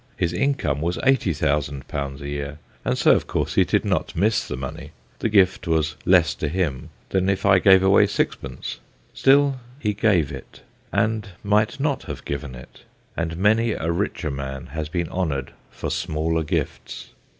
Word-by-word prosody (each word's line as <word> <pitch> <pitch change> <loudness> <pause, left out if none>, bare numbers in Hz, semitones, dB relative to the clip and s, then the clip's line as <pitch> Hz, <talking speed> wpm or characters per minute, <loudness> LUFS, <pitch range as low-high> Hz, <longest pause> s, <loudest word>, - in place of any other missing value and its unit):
His 85 -1 0
income 90 - 0
was 85 +2 -1
80,000 75 - +1
a 70 -2 -3
year, 70 0 -4 0.3
and - - 0
so - - +5
of - - +2
course - - -1
he - - +5
did - - 0
not - - -1
miss 105 +5 +1
the 60 - -4
money: 65 0 -7 0.3
the 115 - 0
gift 95 -3 +3
was 80 -1 +1
less 85 -2 +5
to 75 - -3
him 80 -6 -2 0.2
than 95 0 +1
if 100 0 0
I 95 -1 +6
gave 95 0 +6
away 95 +1 +5
sixpence. - - -3 0.3
Still, 140 0 +4 0.2
he 105 -7 -1
gave 95 -9 +2
it, 65 -2 -10 0.3
and 110 -2 0
might 105 +7 +2
not 140 -1 0
have - - -7
given 70 -2 -4
it, 60 +1 -13 0.3
and 85 0 -3
many 110 +4 +3
a 80 - -2
richer 85 -3 -2
man 70 -1 -5
has 80 -1 -3
been 85 +1 -2
honoured 75 -9 -2 0.2
for - - -5
smaller 80 +1 -1
gifts. 75 - -4
85 Hz, 170 wpm, -23 LUFS, 75-105 Hz, 0.3 s, I